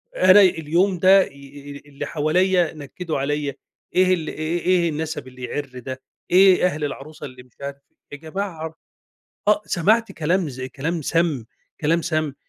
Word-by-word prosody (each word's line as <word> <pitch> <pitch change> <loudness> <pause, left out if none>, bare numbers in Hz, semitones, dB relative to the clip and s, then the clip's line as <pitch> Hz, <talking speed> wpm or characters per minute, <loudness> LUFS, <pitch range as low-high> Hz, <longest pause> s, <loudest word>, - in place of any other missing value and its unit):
أنا 185 +2 +7
اليوم 175 +1 +2
ده 190 +1 +6
ي - - -12
ي 140 +1 -11
اللي 140 0 -6
حواليّا 175 +3 +1
نكدوا 155 +2 -5
عليّا، 145 0 -2 0.4
إيه 185 0 +4
ال 165 -4 -2
إيه 155 +3 -2
إيه 175 -1 +2
النسب 160 -2 -4
اللي 130 0 -12
يعر 140 +2 -4
ده؟! 130 +1 -7 0.3
إيه 185 0 +6
أهل 155 -4 -1
العروسة 145 +2 -7
اللي 125 -2 -11
مش 125 - -27
عارف 140 0 -5 0.3
يا 145 - -7
جماعة 160 0 -5 0.7
آه، 210 0 +4
سمعت 220 +7 +2
كلام 165 +1 0
زي 130 0 -6
كلام 160 +5 -3
سام 160 -6 0 0.4
كلام 165 +2 +2
سام، 155 -4 -1
160 Hz, 160 wpm, -22 LUFS, 140-180 Hz, 0.7 s, أنا